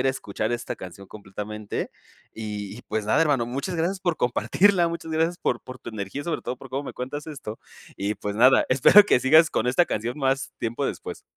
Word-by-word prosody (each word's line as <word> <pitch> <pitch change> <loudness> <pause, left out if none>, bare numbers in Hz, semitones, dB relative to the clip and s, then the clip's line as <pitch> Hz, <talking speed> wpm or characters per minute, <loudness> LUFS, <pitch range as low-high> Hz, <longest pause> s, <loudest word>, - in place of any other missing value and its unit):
ir - - 0
a - - +4
escuchar 110 -3 -3
esta 120 -1 -3
canción 95 +1 -10
completamente. 105 +1 -6 0.4
Y 105 -2 -5
y - - -12
pues 110 -1 -1
nada, 110 - +4
hermano, 145 -6 +2
muchas 140 +9 -3
gracias 175 +4 0
por 175 -4 0
compartirla, 175 +9 +3
muchas 165 -1 -6
gracias 165 +2 +1
por 120 - -1
por 130 0 -10
tu - - -7
energía, 105 +5 -5
sobre 170 -2 -2
todo 125 - -4
por 135 - -12
cómo 135 +2 -3
me - - -6
cuentas 135 +4 -5
esto. 135 -8 -7 0.4
Y 100 +2 -1
pues 105 0 -4
nada, 130 +4 +6
espero 135 +11 +8
que 200 - +4
sigas 155 +4 +6
con 110 - 0
esta 130 +8 +3
canción 120 +4 -3
más 135 0 0
tiempo 120 +5 -2
después. - - -6
130 Hz, 210 wpm, -25 LUFS, 110-155 Hz, 0.4 s, espero